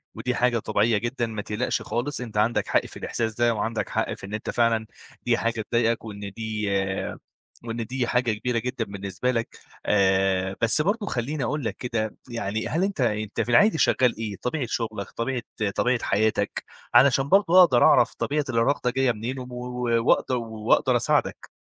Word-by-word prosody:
ودي 125 0 -2
حاجة 120 -1 +2
طبيعية 110 +1 +1
جدًا، 120 +3 -2
ما 110 -2 -5
تقلقش 105 +1 -2
خالص 125 +3 -3
أنت 110 -4 -6
عندك 110 +3 +1
حق - - +2
في - - -10
الإحساس 110 -2 -2
ده 120 0 +2
وعندك 110 +1 -2
حق - - -1
في - - -9
إن 100 - -9
أنت 105 - -4
فعلًا 115 -2 +1 0.4
دي 120 -1 +3
حاجة 115 -1 -1
تضايقك 115 +1 0
وإن 100 -2 -7
دي 110 -2 -3 1.0
وإن 115 0 -4
دي 125 +1 -2
حاجة 125 -2 +1
كبيرة 120 +3 -2
جدًا 125 -1 -3
بالنسبة 100 +4 -3
لك 115 -2 -3 0.3
آآ، 95 -1 +2
بس 115 +6 +3
برضه 205 +5 0
خلّيني 135 - -2
أقول 150 +4 -2
لك 110 - -2
كده 115 -3 -3
يعني، 110 -2 -3
هل 170 +4 0
أنت 195 -7 -1
أنت 110 -1 -1
في 115 - -3
العادي 205 - +5
شغّال 125 -6 +3
إيه؟ 110 -2 -4
طبيعة 130 +1 -2
شُغلك، 110 -4 -3
طبيعة 125 +1 -2 0.3
طبيعة 125 -1 +1
حياتك، 110 +2 0 0.3
علشان 135 +1 +5
برضه 185 -2 +5
أقدَر 125 -9 +4
أعرَف - - +5
طبيعة 150 0 -1
الإرهاق 125 +2 +1
جايّة 130 0 +2
منين 120 +4 -5
وم 125 0 -8
و 125 0 -6 0.3
و 115 0 +2
وأقدَ - - +3
وأقدَر 110 -3 +1
أساعدك؟ - - 0
115 Hz, 180 wpm, -25 LUFS, 110-125 Hz, 1.0 s, العادي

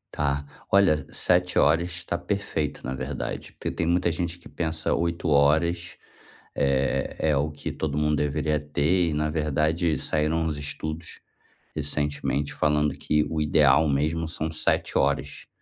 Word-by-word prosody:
Tá. 70 -1 0 0.3
Olha, 95 -6 +4
7 90 0 +1
horas 85 +1 +2
tá 85 - -3
perfeito, 85 -4 -3
na 65 - -2
verdade, 65 - -5
porque - - -4
tem 85 - -2
muita 85 0 +2
gente 85 +1 -3
que 85 - -15
pensa 80 -1 -2
8 85 0 -1
horas, 80 +5 +2 0.6
eh, 70 -1 0
é 75 -2 +2
o 70 +2 +1
que 75 - -5
todo 75 -2 -3
mundo 75 0 +2
deveria 75 +1 0
ter, 75 +4 +1
e - - -2
na 75 +1 0
verdade, 80 +1 +1
saíram 80 +3 0
uns 80 -2 -1
estudos 80 +3 -5 0.6
recentemente 75 -1 -1
falando 75 -1 +1
que 75 0 +1
o 80 -1 -1
ideal 75 0 +4
mesmo 80 +4 0
são 80 -1 -3
7 80 - 0
horas 70 +1 -1
75 Hz, 150 wpm, -25 LUFS, 75-85 Hz, 0.6 s, Olha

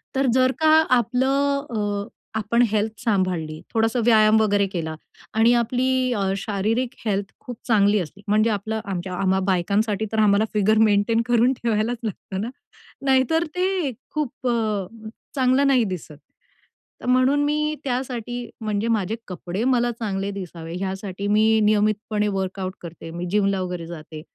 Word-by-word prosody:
तर 270 +1 +2
जर 255 0 +4
का 315 - +3 0.3
आपलं 275 +4 +1
अ, 205 -3 -2 0.3
आपण 225 +2 +1
हेल्थ 215 0 -1
सांभाळली, 180 -7 0
थोडासा 225 +2 +1
व्यायाम 220 -2 +5
वगैरे 205 -2 +2
केला 165 -4 -4 0.4
आणि 225 +2 +4
आपली 255 +2 +1
अ, 195 -1 0
शारीरिक 215 +5 -1 0.2
हेल्थ 200 -2 -1
खूप 245 -2 -8
चांगली 210 -2 +4
असली, 190 +4 -7
म्हणजे 215 +2 +3
आपलं 220 +1 -2
आमच्या 185 -1 -4
आम्हा 190 0 +1
बायकांसाठी 200 +4 +1
तर 220 - 0
आम्हाला 210 0 +4
फिगर 215 +1 +3
मेंटेन 210 +3 +2
करून 240 +2 +3
ठेवायलाच 230 0 -1
लागतं 195 -2 -5
ना. 230 - -3 0.6
नाहीतर 270 +5 +3
ते 365 -5 0 0.2
खूप 275 -4 -3
अ, 215 -5 0 0.5
चांगलं 265 +1 +3
नाही 260 -3 +4
दिसत. 180 -7 -6 0.8
तर - - -9
म्हणून 255 +3 +3
मी 300 +1 0
त्यासाठी 245 -2 -3
म्हणजे 215 0 -1
माझे 220 -2 0
कपडे 180 +2 -4
मला 245 -1 +2
चांगले 200 -4 -3
दिसावे 170 -4 -7
यासाठी 195 +1 -4
मी 220 +1 +4
नियमितपणे 210 0 +1
वर्कआउट 190 -1 -3
करते. 165 -1 -9
मी 175 +2 -5
जिमला 200 -2 +2
वगैरे 180 -2 -4
जाते 155 -2 -9
215 Hz, 145 wpm, -23 LUFS, 195-245 Hz, 0.8 s, व्यायाम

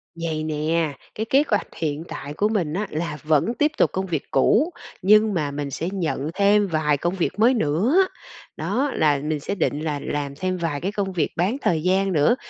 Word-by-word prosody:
Vầy 165 -2 -3
nè, 155 0 0 0.2
cái 220 - -2
kế 275 +2 +5
hoạch 210 - 0
hiện 155 -1 -2
tại 145 - -6
của 205 +7 +1
mình 180 -9 -1
á 200 +4 -2
là 155 -1 -3
vẫn 155 +8 +2
tiếp 300 +4 +1
tục - - +3
công 190 +1 -2
việc 165 -6 -2
cũ, 225 - +3 0.3
nhưng 215 +2 +5
mà 150 -5 -1
mình 140 0 -4
sẽ 165 +6 -3
nhận 160 -6 -2
thêm 200 +2 +3
vài 155 -4 +1
công 175 +6 -1
việc 190 +2 -2
mới 235 +4 +5
nữa, 230 - +2 0.5
đó 275 +2 -1
là 150 -2 +3
mình 155 0 -1
sẽ 145 - -3
định 150 -6 0
là 150 -2 -2
làm 140 -1 -3
thêm 185 +4 -2
vài 165 -5 -2
cái 195 - -1
công 200 -2 -2
việc 170 - 0
bán 190 +9 +1
thời 160 -3 +1
gian 190 +1 +2
nữa, 150 +8 +4
170 Hz, 210 wpm, -23 LUFS, 150-205 Hz, 0.5 s, kế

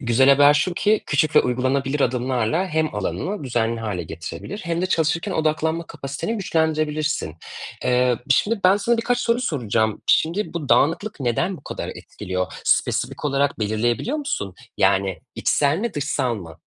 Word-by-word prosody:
Güzel 130 +1 +3
haber 145 +1 +7
şu 175 +4 +1
ki, 215 +3 +2
küçük 150 +1 +1
ve - - +9
uygulanabilir 135 +3 0
adımlarla 125 - 0
hem 155 - 0
alanını 155 - -3
düzenli 115 -2 -1
hâle 100 -6 -3
getirebilir 85 - -7
hem 170 +1 -1
de - - +2
çalışırken 160 -2 0
odaklanma 160 +1 0
kapasiteni 145 +9 -4
güçlendirebilirsin. 155 - -1 0.5
Eee, 125 -1 +2
şimdi, 205 - +2
ben 190 +2 +6
sana 235 +3 +1
birkaç 245 +2 0
soru 240 0 +1
soracağım. 110 - -1
Şimdi, 170 +5 +1
bu 150 -5 -4
dağınıklık 165 +5 +2
neden 135 +10 0
bu - - -17
kadar - - -5
etkiliyor? 90 -2 -5
Spesifik - - 0
olarak 140 0 +1
belirleyebiliyor 115 - 0
musun? 190 - -3 0.2
Yani 95 -1 +2 0.2
içsel 145 +2 +2
mi, 230 +2 -3
dışsal 140 -4 -1
mı? 80 -6 -9
145 Hz, 150 wpm, -22 LUFS, 120-170 Hz, 0.5 s, ve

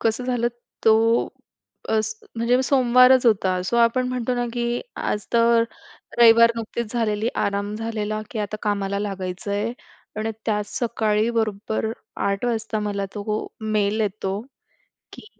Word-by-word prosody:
कसं 225 +2 0
झालं, 245 -2 0 0.4
तो 225 +1 +4 0.6
अस 220 0 0 0.2
म्हणजे 240 +2 +2
सोमवारच 255 -1 +5
होता 190 -4 +2
सो 235 - -1
आपण 235 +2 +3
म्हणतो 250 0 -1
ना, 245 0 -1
की 240 0 -1 0.2
आज 210 -1 -2
तर 230 0 +4 0.5
रविवार 230 0 +7
नुकतीच 230 0 -4
झालेली 220 -2 0 0.2
आराम 200 +1 -2
झालेला, 215 -1 -3
की 230 - -5
आता 210 0 -3
कामाला 200 -1 -1
लागायचं 195 -1 -4
आहे 205 +3 -1 0.4
आणि 215 +1 -2 0.2
त्याच 210 -2 0
सकाळी 220 -2 +1
बरोबर 220 -1 -1 0.4
08:00 200 +3 -1
वाजता 225 -2 -1
मला 205 -1 -2
तो 210 +1 -3
मेल 215 0 0
येतो, 200 -1 -2 0.7
की - - -11
220 Hz, 135 wpm, -23 LUFS, 210-235 Hz, 0.7 s, रविवार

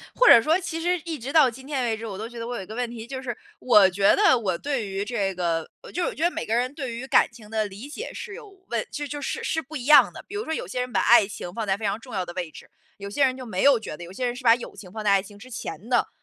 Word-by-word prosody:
或 - - +4
者 235 - +9
说 320 +7 +3
其 340 -2 -4
实 355 +2 +1
一 330 -3 -4
直 260 +4 -6
到 295 -5 +6
今 260 +3 -13
天 280 -3 -1
为 225 -2 0
止， 225 +1 -7
我 195 -3 -6
都 220 +2 -5
觉 240 0 -10
得 230 - -4
我 245 0 -4
有 195 - -5
一 - - -10
个 215 - -8
问 245 -1 -2
题 230 -1 -8
就 260 +1 -6
是， 240 -2 -3 0.2
我 210 -6 +6
觉 195 +2 +3
得 405 -11 +5
我 190 -6 -1
对 275 -7 -2
于 195 0 -3
这 205 -4 -1
个 170 -3 -1
呃， - - -12
就 360 - -2
是 - - +1
我 - - -10
觉 315 - -7
得 345 - +4
每 - - -4
个 220 - -1
人 250 +3 0
对 260 -6 -5
于 240 +3 -6
感 - - +5
情 220 -2 -14
的 220 -1 0
理 205 +7 -9
解 420 +11 -6
是 460 -4 -7
有 440 -2 -11 0.2
问 - - -2
就 295 0 -4
就 290 0 -6
是 - - -3
是 320 0 -1
不 310 +4 -9
一 255 -2 -5
样 300 - +7
的。 - - -10
比 405 - -9
如 415 +2 -2
说 320 - -4
有 315 - -3
些 225 +8 -3
人 250 0 -3
把 195 - +2
爱 230 -2 +6
情 195 -3 -7
放 225 0 -3
在 190 - +2
非 215 +1 -4
常 200 +2 -1
重 250 +2 -13
要 185 -3 -1
的 175 - -8
位 175 -3 -4
置， - - -14 0.3
有 200 - -7
些 275 +8 +2
人 255 - +2
就 255 -1 -8
没 190 -4 -2
有 275 -4 +5
觉 185 - -7
得， 175 - -9
有 175 - -11
些 250 +5 -2
人 245 0 -2
是 255 - -10
把 230 -1 +7
友 240 - -8
情 185 -3 -12
放 220 0 -5
在 210 - +2
爱 195 -1 +4
情 205 0 -14
之 250 +5 -13
前 220 -3 -7
的。 245 -2 +2
235 Hz, 365 characters per minute, -25 LUFS, 205-275 Hz, 0.3 s, 者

